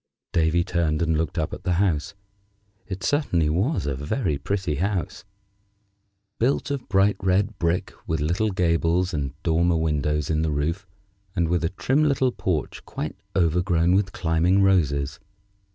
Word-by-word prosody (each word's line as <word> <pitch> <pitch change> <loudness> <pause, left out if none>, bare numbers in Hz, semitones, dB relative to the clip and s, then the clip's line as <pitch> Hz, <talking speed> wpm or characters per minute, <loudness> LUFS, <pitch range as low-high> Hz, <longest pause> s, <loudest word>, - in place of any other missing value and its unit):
Davy 85 +1 +2
turned 85 -4 0
and 80 -1 +1
looked 80 +1 -2
up 80 -2 -1
at - - -6
the 90 - +1
house. 85 -3 0 0.7
It 95 -2 -6
certainly 90 - +1
was 105 - 0
a 70 - -1
very 75 - -2
pretty 95 -1 -2
house, 95 -1 -2 1.1
built 135 +4 +1
of 140 -3 -4
bright 100 0 +3
red 95 +2 +1
brick, 85 +1 0
with 80 -1 0
little 85 +9 +1
gables, 90 0 +1
and 70 -3 -3
dormer 85 +1 +2
windows 75 -1 0
in 80 0 +1
the 80 - 0
roof, 85 +7 -2 0.5
and 85 -3 +1
with 85 -1 +1
a 85 - +1
trim 130 +10 +1
little 135 -3 +2
porch 85 - -3
quite - - -5 0.2
overgrown 90 0 +2
with 95 -1 +2
climbing 85 +4 +2
roses. 70 -7 +1
85 Hz, 150 wpm, -24 LUFS, 80-95 Hz, 1.1 s, bright